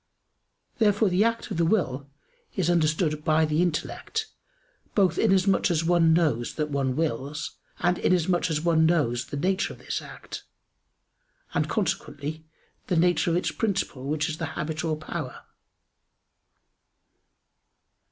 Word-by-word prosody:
Therefore 210 -1 +4
the 185 +3 +3
act 230 0 -1
of - - -2
the 170 - +3
will 145 -8 0 0.5
is 175 -3 +1
understood 155 -2 +1
by 155 +1 +3
the 155 +2 +1
intellect, 180 - -2 0.7
both 185 -4 +3
inasmuch 195 -2 +3
as 165 -2 +1
one 165 -1 +4
knows 150 -8 +1
that 150 -1 -2
one 135 -2 0
wills; 150 -1 -3 0.2
and 175 0 +1
inasmuch 180 0 +2
as 155 -1 0
one 160 -1 +4
knows 130 -8 +1
the 145 - -5
nature 185 +6 0
of - - -14
this - - -4
act, - - -9 1.1
and - - 0
consequently, 155 -6 -2 0.4
the 180 - +1
nature 175 +1 +3
of 170 - +2
its 180 - -1
principle 195 - -2
which 150 +1 0
is 155 0 -4
the 160 - -1
habit 155 +1 -3
or 160 -2 0
power. 155 - -6
165 Hz, 140 wpm, -26 LUFS, 150-180 Hz, 1.1 s, Therefore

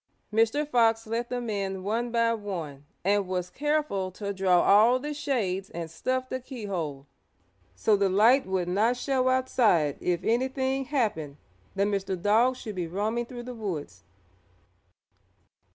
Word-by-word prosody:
Mr. 225 +7 +2
Fox 225 -4 +3
let 230 +2 -3
them 245 -1 -3
in 195 -3 -3
one 230 +4 -1
by 230 0 +2
one 170 -10 -6 0.2
and 200 0 +2
was 180 -1 -3
careful 295 -10 -1
to 200 +2 -5
draw 185 -2 +3
all 220 +5 +6
the 295 +3 -4
shades 205 -10 -2
and 165 -1 -6
stuff 255 +9 -2
the 260 - -3
keyhole 190 - -5 0.7
so 210 - +3
the 200 -1 +2
light 225 +7 +4
would 190 -2 -1
not 215 +7 +2
show 255 0 +1
outside 230 - +2
if 180 0 -1
anything 260 +3 0
happened 210 - -1 0.4
that 200 +1 +2
Mr. 195 -2 -2
Dog 225 +7 +3
should 220 -4 -7
be 180 -3 -3
roaming 215 +7 -2
through 240 -1 -8
the 250 +1 -7
woods. 195 -10 -5
215 Hz, 150 wpm, -27 LUFS, 185-250 Hz, 0.7 s, all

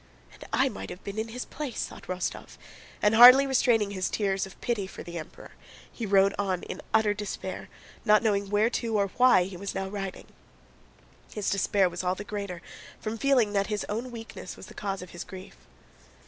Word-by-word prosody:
"And - - -13
I - - +3
might 95 0 -6
have 180 - -9
been 200 +2 -5
in 220 - -2
his 245 +2 -6
place!" 285 -5 -4
thought - - -12
Rostóv, 185 0 -4 0.5
and 210 +1 +4
hardly 250 +4 +10
restraining 240 -6 +2
his 185 -2 -2
tears 195 -2 0
of 190 - -15
pity 220 -5 -1
for - - -9
the 170 -1 -6
Emperor, 155 - -11 0.4
he 230 - -5
rode 195 0 +4
on 190 -3 -1
in - - -6
utter 220 -2 +3
despair, 205 -1 -6 0.3
not 210 +1 +5
knowing 200 -3 +1
where 210 +3 +2
to 230 -3 -1
or 200 -1 +1
why 250 -8 +6
he 185 0 -7
was 200 +2 -5
now 190 - -2
riding. 195 -1 -5 1.1
His 205 -2 -2
despair 195 0 +2
was 175 +1 -5
all 180 +1 +1
the 205 - -6
greater 200 -4 -5 0.4
from 220 +1 -4
feeling 250 -6 +3
that 200 -1 +1
his 210 -2 -2
own 230 +5 -3
weakness 230 -2 -8
was - - -10
the - - -13
cause 195 -2 -4
of 180 - -12
his 175 - -6
grief. 190 0 -11
205 Hz, 200 wpm, -28 LUFS, 190-225 Hz, 1.1 s, hardly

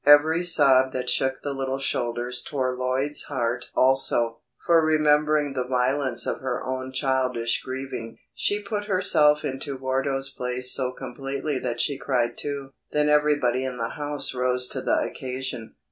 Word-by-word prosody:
Every 150 +3 +5
sob 135 -6 +4
that 125 -1 0
shook 130 0 +1
the 145 - -3
little 135 0 -3
shoulders 120 -2 0
tore 130 -3 -2
Lloyd's 130 +3 0
heart 125 -3 -2
also, 120 -3 +2 0.3
for 165 -2 +4
remembering 150 -1 +2
the 125 -2 -3
violence 130 0 +1
of - - -2
her 130 -2 -3
own 130 0 -4
childish 130 -4 0
grieving, 130 -3 -6 0.2
she 205 0 0
put 205 0 -4
herself 160 -7 +3
into 135 +1 -4
Wardo's 135 +1 -1
place 125 0 +2
so 130 -1 0
completely 135 +2 -4
that 120 -2 -4
she 140 +1 +1
cried 125 -4 -1
too. 140 -2 -5 0.2
Then 150 0 +2
everybody 145 -4 +2
in 130 -1 -4
the 115 -1 -3
house 145 -1 -3
rose 125 0 0
to - - -4
the - - 0
occasion. 130 -3 -5
130 Hz, 155 wpm, -24 LUFS, 125-145 Hz, 0.3 s, Every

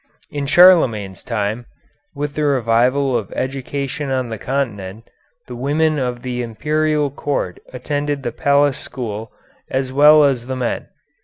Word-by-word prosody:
In 145 -1 -3
Charlemagne's 130 - +5
time, 110 +1 -3 0.5
with 145 0 -3
the 150 - -2
revival 130 0 +2
of 110 -4 -2
education 135 +2 -3
on 130 -2 -1
the 110 -2 -5
Continent, 110 -5 -3 0.4
the 125 - -8
women 150 +4 +1
of 125 -2 -3
the 125 -1 -3
Imperial 150 +5 0
Court 140 -10 -3
attended 145 +2 -3
the 120 - -2
Palace 140 +2 +2
School, 115 -3 -6 0.4
as 130 0 -2
well 150 +2 +7
as 130 -4 +1
the 130 - -3
men. 125 -2 -3
130 Hz, 140 wpm, -19 LUFS, 120-145 Hz, 0.5 s, well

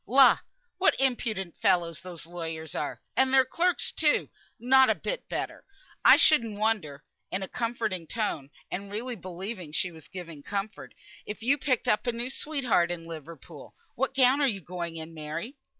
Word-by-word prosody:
"La! 265 +4 +7 0.4
what 385 - +3
impudent 220 -9 0
fellows 170 -3 +2
those 175 -2 -7
lawyers 165 -2 -6
are! 150 - -3 0.2
And 265 0 +3
their 265 -1 +6
clerks, 350 +6 0
too, 300 -2 +2 0.3
not 260 +3 +6
a - - +4
bit - - -4
better. - - -4 0.4
I - - +9
shouldn't 230 -9 +4
wonder" 195 -10 -1 0.3
(in 190 +1 -2
a - - -4
comforting 220 -8 -2
tone, 180 -11 -2 0.2
and 200 +2 -5
really 240 +4 -4
believing 185 -2 -6
she 180 +3 0
was 160 -2 -13
giving 170 -5 -8
comfort) 200 +6 -5 0.3
"if 210 +1 -6
you 270 +4 +4
picked 265 -3 0
up 210 - +2
a - - +3
new 240 +2 -3
sweetheart 265 - +1
in 170 -1 -5
Liverpool. 165 -2 -10 0.2
What 265 - -1
gown 265 +2 +5
are 280 - +4
you 200 -6 -1
going 170 -1 -5
in, 160 0 -7
Mary?" 160 - -5
200 Hz, 170 wpm, -28 LUFS, 170-250 Hz, 0.4 s, I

